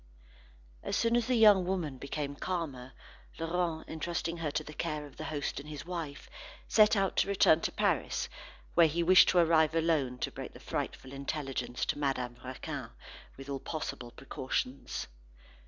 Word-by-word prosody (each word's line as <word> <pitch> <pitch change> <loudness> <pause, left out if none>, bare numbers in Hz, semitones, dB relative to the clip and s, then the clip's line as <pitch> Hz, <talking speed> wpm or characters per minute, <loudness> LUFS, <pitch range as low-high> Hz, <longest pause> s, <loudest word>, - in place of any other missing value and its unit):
As - - -2
soon 230 0 +2
as 240 -2 +2
the 255 - +2
young 210 -4 +7
woman 175 -8 -2
became 140 +1 -4
calmer, 140 -8 -4 0.4
Laurent 165 0 -1
entrusting 170 +1 -3
her 165 -2 -2
to 155 +1 -2
the 150 - -9
care 150 0 -3
of 145 - -14
the 155 - -5
host 145 -3 -3
and 145 +2 -10
his 150 0 -7
wife, 165 -5 -5 0.4
set 215 0 +6
out 195 -2 +1
to - - +3
return 180 -5 +5
to - - -1
Paris, - - 0 0.5
where 170 -1 +6
he 170 +3 0
wished 185 +2 +7
to - - +2
arrive 160 -2 +4
alone 155 -6 +1
to - - -2
break - - -7
the - - -12
frightful 130 - -4
intelligence 135 -3 -3
to - - -1
Madame 130 -4 -1
Raquin, 130 0 -5 0.5
with 135 0 -9
all 140 -1 -3
possible 145 -6 -5
precautions. 130 +1 -3
155 Hz, 170 wpm, -31 LUFS, 140-170 Hz, 0.5 s, young